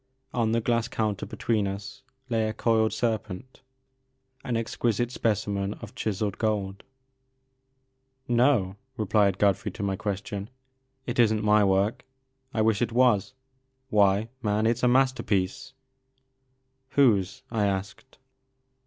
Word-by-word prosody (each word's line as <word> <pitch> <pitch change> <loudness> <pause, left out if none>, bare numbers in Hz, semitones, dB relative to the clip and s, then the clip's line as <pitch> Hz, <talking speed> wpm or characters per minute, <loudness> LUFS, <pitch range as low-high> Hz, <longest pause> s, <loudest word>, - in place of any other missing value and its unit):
On 115 -2 +1
the 115 +1 +1
glass 115 0 +1
counter 105 -3 -2
between 110 -4 -1
us 100 +1 -6 0.3
lay 110 -3 0
a - - -3
coiled 110 -1 +2
serpent, 115 +1 -3 0.8
an 120 -2 -1
exquisite 115 +1 -1
specimen 100 -4 -1
of - - -11
chiselled 105 -2 -2
gold. 100 -3 -1 1.4
No," 120 -6 +2 0.2
replied 105 -3 +2
Godfrey 100 +1 +2
to - - -5
my 100 -1 0
question, 100 +1 -4 0.6
it 120 0 -3
is 115 -2 +5
n*t 110 -1 -1
my 105 0 +5
work; 100 +2 +1 0.5
I 110 -4 +1
wish 110 -1 +2
it 120 -1 0
was. 125 -1 +2 0.6
Why, 105 +1 +3
man, 105 0 +1
it 115 +1 +2
*s - - -8
a 125 - +3
masterpiece 130 -3 +1
I" 130 0 -43
'^ - - -23
Whose 105 -10 +3
?'» - - -35
I 105 -3 +1
asked. 100 +6 -5
110 Hz, 135 wpm, -27 LUFS, 100-120 Hz, 1.4 s, is